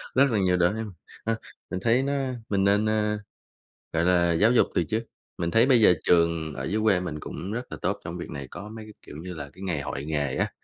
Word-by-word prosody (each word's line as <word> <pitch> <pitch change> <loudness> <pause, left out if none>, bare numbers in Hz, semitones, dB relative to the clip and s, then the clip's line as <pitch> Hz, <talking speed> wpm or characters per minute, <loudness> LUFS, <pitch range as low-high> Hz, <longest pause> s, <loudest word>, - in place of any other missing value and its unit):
Rất 135 0 +5
là 105 - +2
nhiều 90 -1 +3
đó 90 +2 +4
ha, 110 +1 -3 0.4
ha, 115 0 +1 0.4
mình 95 - -2
thấy 115 +6 +3
nó 140 +1 0 0.4
mình 100 -1 +2
nên, 100 +2 +3
ơ, 105 -1 +1 0.7
gọi 80 +1 +1
là 85 -1 +4
giáo 105 +8 +4
dục 125 - +5
từ - - +2
trước, 110 +1 -1 0.4
mình 85 0 -1
thấy 115 +5 +5
bây 125 -4 +5
giờ 90 -4 +7
trường 85 -3 +2
ở 65 - -5
dưới 105 +9 0
quê 100 -5 +4
mình 75 -4 -4
cũng 95 +6 -6
rất 120 +2 -5
là - - -5
tốt - - -1
trong 85 +2 -5
việc 85 - -6
này, 70 -2 -6
có 105 - -8
mấy 110 0 -8
cái, 110 - -12
kiểu - - -9
như 90 +3 -7
là, 70 -3 -7
cái 95 - -13
ngày 90 -7 -1
hội 70 +1 -4
nghề 75 -3 -1
á, - - 0
95 Hz, 255 wpm, -26 LUFS, 85-110 Hz, 0.7 s, giờ